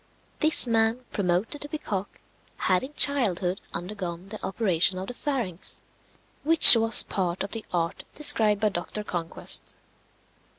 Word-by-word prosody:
This 310 -2 +5
man, 225 +2 0
promoted 195 +8 -3
to 290 - -7
be 310 - -5
cock, 200 -8 -7 0.4
had 185 -1 0
in 285 +3 -10
childhood 195 -10 +1
undergone 180 0 -7
the 215 0 -9
operation 185 -3 -1
of 185 - -6
the - - -7
pharynx, 240 - -5 0.6
which 320 -4 +8
was 225 -1 +6
part 185 -1 -4
of 195 - -8
the 225 -2 -7
art 170 0 -4
described 215 -8 +4
by 215 - +1
Dr. 195 +3 -6
Conquest. 170 -4 -4
205 Hz, 140 wpm, -24 LUFS, 180-235 Hz, 0.6 s, which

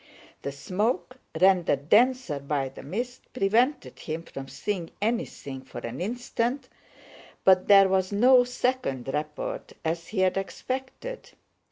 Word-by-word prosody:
The 140 - -3
smoke, 210 - -2 0.2
rendered 175 -6 +3
denser 245 - +4
by 140 -1 -1
the 135 - -11
mist, 240 - -4
prevented 245 +5 +1
him 160 +1 -4
from 135 -4 -8
seeing 185 +1 -3
anything 205 - -2
for 130 - -12
an 120 +5 -5
instant, 245 +4 -2 0.7
but 185 -1 +5
there 195 -1 +8
was 190 0 +1
no 245 +5 +6
second 245 - -1
report 150 0 -4
as 165 +1 -2
he 200 -3 -1
had 185 0 +2
expected. 260 - -5
195 Hz, 130 wpm, -27 LUFS, 150-245 Hz, 0.7 s, there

